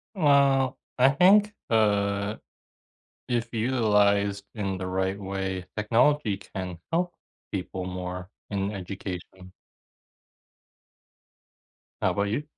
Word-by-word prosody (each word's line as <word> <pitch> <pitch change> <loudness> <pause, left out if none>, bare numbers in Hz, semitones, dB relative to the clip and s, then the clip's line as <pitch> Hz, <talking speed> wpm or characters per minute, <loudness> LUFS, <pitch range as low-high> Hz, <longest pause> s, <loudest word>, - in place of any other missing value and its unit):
Well, 140 -5 +4 0.2
I 130 +2 +7
think, 200 +8 +5 0.2
uh, 100 -1 +2 0.9
if 120 -1 -1
utilized 105 -4 +2
in 100 -4 -2
the 95 - -4
right 95 +1 -1
way, 95 -1 -3
technology 115 +1 +2
can 95 -3 -7
help 175 +1 0 0.4
people 95 -1 -4
more 90 0 -5 0.2
in 100 -1 -1
education. 95 -1 -7 2.5
How - - +2
'bout 100 - +1
you? 115 +9 -1
100 Hz, 95 wpm, -27 LUFS, 95-125 Hz, 2.5 s, I